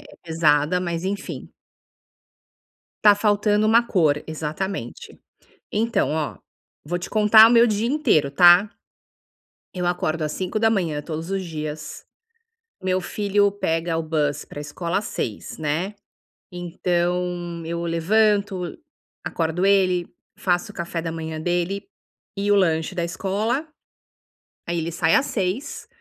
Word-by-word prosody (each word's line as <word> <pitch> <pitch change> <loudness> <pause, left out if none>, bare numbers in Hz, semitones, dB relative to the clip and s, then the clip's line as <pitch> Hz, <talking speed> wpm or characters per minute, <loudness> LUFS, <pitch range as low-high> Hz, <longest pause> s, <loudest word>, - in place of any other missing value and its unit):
é - - -16
pesada, 160 +1 +2
mas, 170 -1 -3
enfim. 200 +1 -5 1.5
Tá 205 -1 +7
faltando 210 0 +2
uma 225 +2 +5
cor, 155 -10 +2
exatamente. 155 -2 -5 0.5
Então, 230 +3 +1
ó, 155 -1 -2 0.5
vou 175 +4 -2
te 180 - -8
contar 220 +1 +7
o - - +2
meu 235 0 +6
dia 215 +2 0
inteiro, 160 - +2
tá? 175 +6 +7 1.1
Eu 180 -1 -3
acordo 165 -2 -1
às 150 - -2
05:00 190 -5 0
todos 160 +2 -6
os 195 -1 -2
dias, 155 -2 -6 0.8
meu 185 0 +1
filho 205 +2 +1
pega 165 -4 -1
o 165 - -1
bus, 150 -2 -1
para - - -10
escola 170 +5 -3
às 210 - -3
06:00, 105 - -5
né, 160 +6 -2 0.6
então 175 0 -2
eu 170 +1 -3
levanto, 195 +2 +1 0.5
acordo 165 +3 -1
ele, 185 -3 +3 0.3
faço 180 +3 0
o - - -25
café 170 -1 -4
da 165 0 -4
manhã 160 -1 -5
dele, 175 +4 -1 0.5
e 200 +1 0
o 205 - +6
lanche 165 -2 +1
da 175 - -1
escola, 210 - -2 1.0
aí 170 0 -1
ele 165 +1 -3
sai 165 0 +2
às 270 - +3
06:00, 200 +8 -3
175 Hz, 130 wpm, -23 LUFS, 160-200 Hz, 1.5 s, Tá